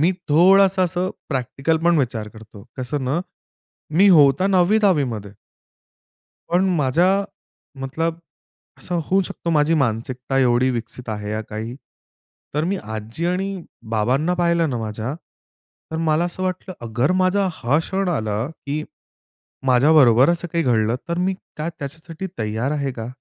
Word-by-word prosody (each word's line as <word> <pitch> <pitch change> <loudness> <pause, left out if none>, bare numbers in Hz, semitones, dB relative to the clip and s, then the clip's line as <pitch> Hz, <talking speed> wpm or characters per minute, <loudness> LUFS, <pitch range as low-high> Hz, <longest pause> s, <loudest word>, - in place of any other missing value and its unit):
मी 170 +5 +4 0.2
थोडंसं 190 +4 +5
असं 180 +1 -1 0.2
प्रॅक्टिकल 135 +3 -1
पण 170 -1 +4
विचार 120 -5 -2
करतो. 110 -1 -14
कसं 130 +2 -3
ना, 140 +7 0 0.7
मी 195 +5 +6
होतो 150 0 +5
9वी-10वीमध्ये 175 - +2 1.2
पण 175 +2 +3
माझ्या 175 +8 +2 0.6
मतलब 165 +5 -2 0.6
असं 175 -1 -2
होऊ 195 +4 +2
शकतो 170 -1 -5
माझी 155 0 +3
मानसिकता 130 0 -1
एवढी 125 0 +3
विकसित 120 0 -6
आहे, 105 -1 -4
या 110 +1 -2
काही, 110 +2 -6 0.8
तर 150 +1 +1
मी 190 +4 0
आजी 110 +9 -4
आणि 185 +1 -2 0.3
बाबांना 130 +10 +1
पाहिलं 170 -2 +2
ना 120 - -2
माझ्या, 110 +4 -4 0.8
तर - - -2
मला 160 0 +1
असं 175 +1 -4
वाटलं 185 0 -3
अगर 120 +9 +1
माझा 190 +1 +2
हा 140 -1 +1
क्षण 190 +3 -2
आला, 110 -9 -1
की 150 -1 -5 0.8
माझ्याबरोबर 130 0 +5
असं 175 0 -2
काही 170 -1 +1
घडलं. 115 -1 +2
तर 170 +1 -1
मी 190 +1 +1 0.2
काय 155 +2 -3
त्याच्यासाठी 160 +5 -7
तयार 110 +4 -1
आहे 140 -3 -2
का? 115 -2 -6
150 Hz, 140 wpm, -21 LUFS, 120-175 Hz, 1.2 s, मी